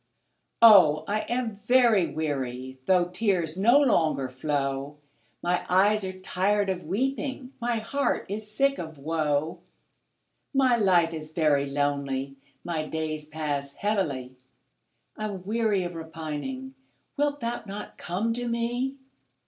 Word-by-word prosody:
Oh, 175 -9 +8
I 210 +1 0
am 240 -3 -2
very 235 -7 +4
weary, 130 -4 -4
Though 180 -2 +4
tears 180 -4 0
no 235 +9 +5
longer 160 - +2
flow; 140 +1 -2 0.5
My 175 0 +1
eyes 205 +3 +4
are 190 - -3
tired 195 +2 +1
of 180 -1 -4
weeping, 265 - -2
My 240 0 0
heart 255 +6 -1
is 210 +2 -5
sick 275 +4 +1
of 160 -2 -7
woe; 155 +2 -1 1.0
My 260 -2 +4
life 180 -6 +3
is 155 -1 -7
very 150 -3 +2
lonely 140 -1 -1 0.3
My 165 -3 -2
days 155 -1 -3
pass 145 -3 -3
heavily, 145 -12 -2 0.8
I'm 205 -4 -4
weary 215 -1 +1
of 175 0 -4
repining; 165 - -6 0.4
Wilt 290 0 0
thou 235 -1 -3
not 200 +1 -8
come 200 +7 -1
to 245 +1 -3
me? 240 +3 -1
180 Hz, 125 wpm, -27 LUFS, 155-230 Hz, 1.0 s, Oh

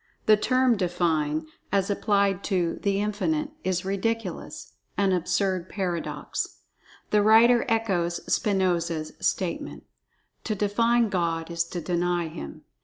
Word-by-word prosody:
The 215 - +7
term 255 +2 +2
"define," 165 -4 0 0.3
as 195 0 +1
applied 200 -1 +1
to 180 -4 0
"The 200 -1 +1
Infinite," 290 +10 -1
is 185 -1 -1
ridiculous—an 200 -1 -3
absurd 185 0 0
paradox. 180 -4 -3 0.5
The 210 - +4
writer 230 +4 +6
echoes 190 -7 +1
Spinoza's 175 -5 0
statement: - - -2 0.6
"To 215 - -1
define 230 +3 +2
God 170 -3 -1
is 170 0 0
to 175 +1 -5
deny 175 0 0
Him." 70 - -8
190 Hz, 110 wpm, -26 LUFS, 170-210 Hz, 0.6 s, The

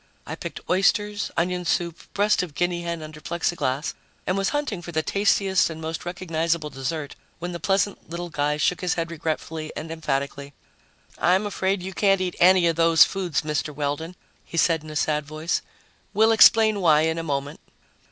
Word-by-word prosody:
I - - -6
picked - - -7
oysters, 205 +2 +1
onion 180 +1 0
soup, 170 -1 -1 0.2
breast 205 +1 +3
of 170 -5 -6
guinea 175 +1 0
hen 170 -2 -4
under 155 0 -10
Plexiglas 165 -4 -2 0.3
and 185 - 0
was 195 0 +1
hunting 290 -11 -2
for 175 - -8
the 160 -1 0
tastiest 195 -1 +2
and 160 -1 -7
most 160 +1 -5
recognizable 165 -3 -2
dessert 140 +3 -4 0.2
when 175 +1 -5
the 170 - -5
pleasant 195 +4 0
little 170 +1 -5
guy 150 0 0
shook 175 +4 +1
his 180 -2 0
head 165 0 -3
regretfully 160 -1 -4
and 160 - -6
emphatically. 140 -2 -3 0.6
"I'm 185 +4 +3
afraid 190 -2 -1
you 190 +1 -5
can't 195 -1 +3
eat 185 -1 -2
any 180 0 +6
of 165 -1 +1
those 165 -1 +6
foods, 185 -6 -1
Mr. 150 -1 -2
Weldon," 150 +4 -3 0.3
he 170 - -8
said 165 -2 +3
in 155 - -10
a 155 - -8
sad 150 0 +1
voice. 155 +3 -2 0.5
"We'll 220 +2 +5
explain 220 -2 +6
why 155 -4 +5
in 160 +1 0
a - - -2
moment." 140 -2 -3
170 Hz, 180 wpm, -24 LUFS, 155-185 Hz, 0.6 s, any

